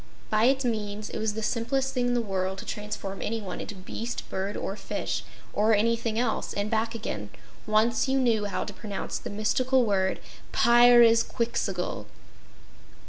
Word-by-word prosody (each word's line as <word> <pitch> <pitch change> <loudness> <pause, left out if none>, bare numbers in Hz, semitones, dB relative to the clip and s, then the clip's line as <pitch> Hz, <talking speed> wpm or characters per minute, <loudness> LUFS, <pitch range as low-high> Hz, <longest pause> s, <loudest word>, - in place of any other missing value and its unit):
By 215 +1 +4
its 265 +1 +3
means, 215 -2 -2
it - - -4
was 215 -1 -1
the 220 - -3
simplest 260 +4 0
thing 250 -1 +1
in 245 - +1
the 240 - +1
world 190 -2 -2
to - - -7
transform 210 -2 -5
anyone 215 -4 -3
into 210 - -6
beast, 225 +5 -5
bird 195 +2 -2
or 195 - -3
fish, - - -3 0.3
or 215 +1 +4
anything 230 +1 +1
else, 235 -1 -1
and 205 +2 -2
back 225 +1 0
again, 105 - -4 0.4
once 220 +4 +3
you 265 +1 +2
know 230 -5 +2
how 200 - -2
to - - -7
pronounce 205 -3 -5
the - - -7
mystical 250 +5 +2
word: 190 -3 +1 0.3
"Pyrzqxgl." 235 - +4
220 Hz, 160 wpm, -27 LUFS, 205-235 Hz, 0.4 s, By